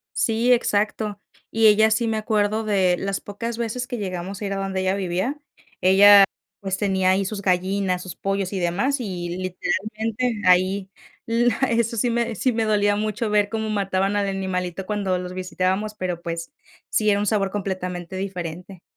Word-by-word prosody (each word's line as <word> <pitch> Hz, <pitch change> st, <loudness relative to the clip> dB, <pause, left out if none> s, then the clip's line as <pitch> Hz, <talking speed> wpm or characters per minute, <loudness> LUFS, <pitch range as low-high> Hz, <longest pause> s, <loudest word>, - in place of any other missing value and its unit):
Sí, 230 Hz, +2 st, +2 dB
exacto. 210 Hz, -3 st, +1 dB, 0.3 s
Y 225 Hz, 0 st, +4 dB
ella 220 Hz, +1 st, +5 dB
sí 230 Hz, +2 st, +1 dB
me 220 Hz, -1 st, 0 dB
acuerdo 215 Hz, 0 st, 0 dB
de 190 Hz, -4 st, +2 dB
las 195 Hz, +1 st, -3 dB
pocas 230 Hz, +3 st, -5 dB
veces 235 Hz, +2 st, -3 dB
que 245 Hz, -1 st, -4 dB
llegamos 190 Hz, -1 st, -5 dB
a -, -, -2 dB
ir 195 Hz, -, -2 dB
a -, -, -3 dB
donde 195 Hz, -1 st, -2 dB
ella 190 Hz, +1 st, +1 dB
vivía, 195 Hz, +9 st, -2 dB, 0.4 s
ella, 200 Hz, +2 st, +8 dB, 0.3 s
pues, 190 Hz, -1 st, -3 dB
tenía 190 Hz, -2 st, +2 dB
ahí 190 Hz, +1 st, +2 dB
sus 200 Hz, +1 st, -4 dB
gallinas, 185 Hz, 0 st, 0 dB
sus 180 Hz, -1 st, -8 dB
pollos 195 Hz, -1 st, -2 dB
y 195 Hz, -, -1 dB
demás, 190 Hz, +11 st, 0 dB
y, 180 Hz, -7 st, -4 dB
literalmente, 215 Hz, +5 st, -2 dB
ahí 185 Hz, +2 st, +3 dB, 0.4 s
la 230 Hz, 0 st, +2 dB
eso 230 Hz, 0 st, +1 dB
sí 235 Hz, +2 st, +1 dB
me 235 Hz, -1 st, -1 dB
sí 255 Hz, +6 st, +1 dB
me 225 Hz, -1 st, 0 dB
dolía 205 Hz, -1 st, +2 dB
mucho 215 Hz, +1 st, -2 dB
ver 210 Hz, -1 st, +3 dB
cómo 220 Hz, 0 st, -3 dB
mataban 195 Hz, -1 st, 0 dB
al 200 Hz, -1 st, 0 dB
animalito 190 Hz, -1 st, -3 dB
cuando 200 Hz, -3 st, -1 dB
los 180 Hz, 0 st, -6 dB
visitábamos, 185 Hz, +3 st, -1 dB
pero 180 Hz, -4 st, -3 dB
pues, 170 Hz, 0 st, -5 dB, 0.4 s
sí 215 Hz, -1 st, +2 dB
era 200 Hz, -1 st, +3 dB
un 205 Hz, -, 0 dB
sabor 195 Hz, -2 st, +1 dB
completamente 185 Hz, -3 st, -4 dB
diferente. 180 Hz, -1 st, -6 dB
200 Hz, 175 wpm, -23 LUFS, 185-215 Hz, 0.4 s, ella